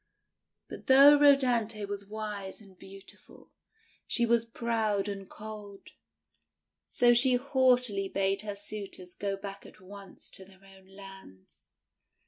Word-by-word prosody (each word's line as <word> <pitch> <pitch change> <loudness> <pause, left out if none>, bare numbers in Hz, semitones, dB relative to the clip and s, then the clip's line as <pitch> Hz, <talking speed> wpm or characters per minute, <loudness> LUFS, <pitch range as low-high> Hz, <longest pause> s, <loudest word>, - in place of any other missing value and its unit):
But - - -11
though 280 +2 +7
Rhodanthe 240 -7 +2
was 200 0 -7
wise 205 -2 -6
and 195 -3 -17
beautiful, 195 +1 -15 0.6
she 235 - +1
was 235 0 +1
proud 220 -3 -2
and 195 -2 -7
cold; 210 -2 -11 1.0
so 240 -1 +3
she 250 +1 +3
haughtily 250 -6 +1
bade 195 0 -1
her 205 -1 -6
suitors 200 -3 -8
go 200 -1 -4
back 195 0 -9
at - - -16
once 195 +1 -12
to 190 - -12
their 190 0 -20
own 190 -1 -18
lands. 195 - -15
205 Hz, 125 wpm, -29 LUFS, 195-235 Hz, 1.0 s, though